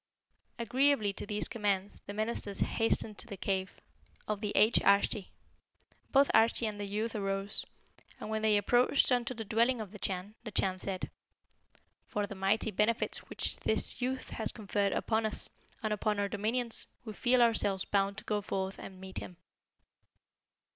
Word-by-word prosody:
Agreeably 240 Hz, -2 st, +2 dB
to 205 Hz, -, -6 dB
these 210 Hz, 0 st, -2 dB
commands, 205 Hz, -3 st, -1 dB
the 200 Hz, -, -5 dB
ministers 215 Hz, -2 st, -2 dB
hastened 225 Hz, -2 st, 0 dB
to -, -, -2 dB
the 200 Hz, -4 st, -7 dB
cave 190 Hz, 0 st, -2 dB, 0.5 s
of 210 Hz, -1 st, -2 dB
the 210 Hz, -2 st, -1 dB
aged 215 Hz, +3 st, +5 dB
Arschi. 200 Hz, 0 st, +3 dB, 0.8 s
Both 275 Hz, 0 st, +4 dB
Arschi 225 Hz, +1 st, +4 dB
and 210 Hz, -1 st, -5 dB
the 205 Hz, -, -3 dB
youth 215 Hz, +3 st, -2 dB
arose, 195 Hz, 0 st, -1 dB, 0.6 s
and -, -, -6 dB
when 220 Hz, 0 st, -2 dB
they 215 Hz, -1 st, +4 dB
approached 245 Hz, +7 st, +3 dB
unto 250 Hz, 0 st, +1 dB
the 225 Hz, -1 st, -5 dB
dwelling 235 Hz, +3 st, +2 dB
of 210 Hz, -4 st, -6 dB
the 210 Hz, -, -10 dB
Chan, 190 Hz, +2 st, -3 dB
the 225 Hz, -, -5 dB
Chan 190 Hz, -2 st, 0 dB
said, 190 Hz, -1 st, -4 dB, 1.0 s
'For 205 Hz, 0 st, -1 dB
the 200 Hz, -, -7 dB
mighty 200 Hz, +3 st, +1 dB
benefits 215 Hz, +4 st, +1 dB
which -, -, -2 dB
this -, -, +1 dB
youth 255 Hz, +1 st, -2 dB
has 220 Hz, -, -2 dB
conferred 200 Hz, -2 st, -1 dB
upon 225 Hz, 0 st, 0 dB
us, 220 Hz, -, -2 dB, 0.3 s
and 215 Hz, -1 st, 0 dB
upon 210 Hz, 0 st, 0 dB
our 200 Hz, -, +1 dB
dominions, 225 Hz, +3 st, +2 dB, 0.2 s
we 215 Hz, -, -6 dB
feel 250 Hz, +4 st, +3 dB
ourselves 205 Hz, -5 st, +2 dB
bound 200 Hz, 0 st, +1 dB
to -, -, -6 dB
go 210 Hz, -1 st, -1 dB
forth 195 Hz, -1 st, -3 dB
to -, -, -8 dB
meet 190 Hz, 0 st, -8 dB
him.' 180 Hz, -, -9 dB
210 Hz, 170 wpm, -32 LUFS, 200-225 Hz, 1.0 s, aged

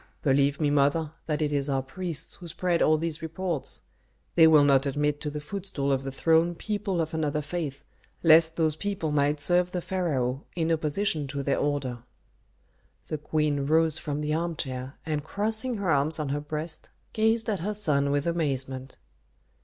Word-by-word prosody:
"Believe 140 Hz, 0 st, +2 dB
me, 150 Hz, -2 st, +2 dB
mother, 145 Hz, +2 st, +2 dB, 0.2 s
that 155 Hz, -1 st, 0 dB
it 150 Hz, -1 st, -1 dB
is 140 Hz, 0 st, +1 dB
our 135 Hz, -1 st, 0 dB
priests 165 Hz, +3 st, -3 dB
who 175 Hz, -, -10 dB
spread 170 Hz, +1 st, 0 dB
all 155 Hz, 0 st, +4 dB
these 165 Hz, 0 st, -2 dB
reports. 165 Hz, -1 st, -3 dB, 0.5 s
They 165 Hz, -2 st, +7 dB
will 155 Hz, -2 st, +7 dB
not 140 Hz, -1 st, +4 dB
admit 145 Hz, +1 st, 0 dB
to 150 Hz, -, -2 dB
the 150 Hz, +1 st, -5 dB
footstool 150 Hz, -3 st, -3 dB
of 135 Hz, -1 st, +1 dB
the 135 Hz, 0 st, -5 dB
throne 165 Hz, +4 st, +2 dB
people 205 Hz, -2 st, -2 dB
of 160 Hz, -1 st, -2 dB
another 150 Hz, -1 st, -1 dB
faith 145 Hz, -2 st, -4 dB, 0.4 s
lest 165 Hz, 0 st, +6 dB
those 160 Hz, -2 st, +2 dB
people 190 Hz, -3 st, -2 dB
might 145 Hz, 0 st, +1 dB
serve 175 Hz, +4 st, +3 dB
the 180 Hz, -, -2 dB
pharaoh 145 Hz, -8 st, -1 dB
in 165 Hz, -1 st, 0 dB
opposition 155 Hz, 0 st, 0 dB
to 140 Hz, +1 st, -4 dB
their 140 Hz, 0 st, +1 dB
order." 140 Hz, -4 st, -1 dB, 1.1 s
The 155 Hz, -, -3 dB
queen 150 Hz, -2 st, 0 dB
rose 160 Hz, 0 st, +3 dB
from 150 Hz, -1 st, -3 dB
the 150 Hz, 0 st, -1 dB
armchair, 140 Hz, -5 st, -3 dB
and 155 Hz, -2 st, -2 dB
crossing 220 Hz, -, -1 dB
her 195 Hz, -4 st, 0 dB
arms 145 Hz, +2 st, +2 dB
on 150 Hz, -3 st, -3 dB
her 145 Hz, +1 st, -1 dB
breast, 155 Hz, +2 st, -5 dB, 0.2 s
gazed 220 Hz, 0 st, +2 dB
at 210 Hz, -4 st, 0 dB
her 205 Hz, +5 st, -2 dB
son 145 Hz, -9 st, +2 dB
with 145 Hz, 0 st, 0 dB
amazement. 135 Hz, -6 st, -1 dB
155 Hz, 175 wpm, -27 LUFS, 145-170 Hz, 1.1 s, They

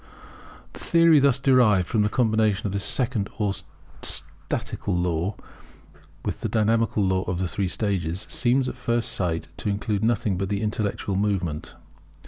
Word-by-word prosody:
The -, -, -10 dB
theory 165 Hz, -2 st, +5 dB
thus 140 Hz, -3 st, +4 dB
derived 125 Hz, -9 st, +4 dB
from 110 Hz, -, +1 dB
the 105 Hz, -, +2 dB
combination 110 Hz, -2 st, +1 dB
of 100 Hz, -, -2 dB
this 100 Hz, -1 st, -2 dB
second 115 Hz, -5 st, +1 dB
or 105 Hz, -2 st, 0 dB, 0.5 s
statical 95 Hz, -3 st, -2 dB
law 90 Hz, +2 st, -1 dB, 0.9 s
with -, -, -3 dB
the -, -, -2 dB
dynamical 110 Hz, -1 st, +1 dB
law 95 Hz, -1 st, +1 dB
of 90 Hz, -1 st, -2 dB
the 90 Hz, 0 st, -1 dB
three 95 Hz, +3 st, -1 dB
stages, 95 Hz, -2 st, -2 dB
seems 130 Hz, +1 st, +2 dB
at -, -, -3 dB
first 120 Hz, -2 st, 0 dB
sight 85 Hz, -3 st, -1 dB
to -, -, -3 dB
include 105 Hz, 0 st, -1 dB
nothing 110 Hz, -4 st, +1 dB
but 95 Hz, -1 st, -2 dB
the 100 Hz, +1 st, -1 dB
intellectual 105 Hz, -2 st, -2 dB
movement. 95 Hz, -6 st, -2 dB
105 Hz, 155 wpm, -24 LUFS, 95-115 Hz, 0.9 s, theory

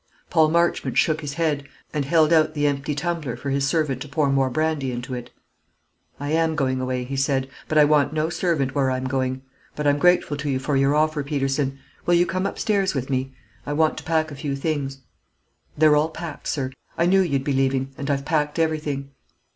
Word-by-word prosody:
Paul 160 Hz, -2 st, +4 dB
Marchmont 170 Hz, +1 st, +1 dB
shook 155 Hz, 0 st, +2 dB
his 145 Hz, -2 st, -5 dB
head, 150 Hz, -4 st, 0 dB, 0.3 s
and 145 Hz, -2 st, -1 dB
held 160 Hz, +2 st, +4 dB
out 155 Hz, -1 st, +3 dB
the 145 Hz, 0 st, +1 dB
empty 140 Hz, 0 st, 0 dB
tumbler 155 Hz, -4 st, -2 dB
for 140 Hz, -, -4 dB
his 135 Hz, 0 st, +1 dB
servant 145 Hz, -5 st, 0 dB
to 145 Hz, -, -5 dB
pour 140 Hz, 0 st, +1 dB
more 135 Hz, -1 st, +2 dB
brandy 155 Hz, -1 st, 0 dB
into 120 Hz, +1 st, -5 dB
it. 125 Hz, -1 st, -6 dB, 0.9 s
"I 145 Hz, +1 st, -3 dB
am 160 Hz, 0 st, +2 dB
going 130 Hz, -3 st, 0 dB
away," 130 Hz, -1 st, -2 dB
he 135 Hz, +2 st, -5 dB
said; 135 Hz, -1 st, +1 dB, 0.2 s
"but 155 Hz, -, 0 dB
I 150 Hz, -, +8 dB
want 145 Hz, -1 st, +3 dB
no 155 Hz, 0 st, 0 dB
servant 160 Hz, -6 st, 0 dB
where 135 Hz, -2 st, +2 dB
I'm 130 Hz, 0 st, -1 dB
going; 130 Hz, 0 st, -1 dB, 0.3 s
but 150 Hz, -, -3 dB
I'm 145 Hz, 0 st, +3 dB
grateful 180 Hz, -3 st, +3 dB
to 145 Hz, 0 st, -3 dB
you 135 Hz, -, +1 dB
for 140 Hz, +2 st, -1 dB
your 135 Hz, +2 st, +3 dB
offer, 155 Hz, 0 st, +2 dB
Peterson. 135 Hz, -1 st, -1 dB, 0.3 s
Will 175 Hz, -, +5 dB
you 175 Hz, +1 st, +4 dB
come 185 Hz, +2 st, -1 dB
upstairs 195 Hz, -5 st, 0 dB
with 135 Hz, 0 st, -3 dB
me? 130 Hz, 0 st, -2 dB, 0.3 s
I 145 Hz, -, -3 dB
want 155 Hz, +1 st, +2 dB
to -, -, -12 dB
pack 160 Hz, 0 st, 0 dB
a -, -, -7 dB
few 140 Hz, 0 st, -3 dB
things." 135 Hz, -2 st, -3 dB, 0.8 s
"They're 155 Hz, 0 st, +6 dB
all 150 Hz, +2 st, +2 dB
packed, 160 Hz, -2 st, -7 dB
sir. 130 Hz, -3 st, -2 dB, 0.3 s
I 170 Hz, -, +3 dB
knew 190 Hz, +2 st, +4 dB
you'd 140 Hz, -7 st, 0 dB
be 140 Hz, -, 0 dB
leaving, 135 Hz, 0 st, +1 dB
and 140 Hz, 0 st, -5 dB
I've 140 Hz, -1 st, 0 dB
packed 150 Hz, -1 st, 0 dB
everything." 150 Hz, -4 st, -1 dB
145 Hz, 210 wpm, -23 LUFS, 135-155 Hz, 0.9 s, I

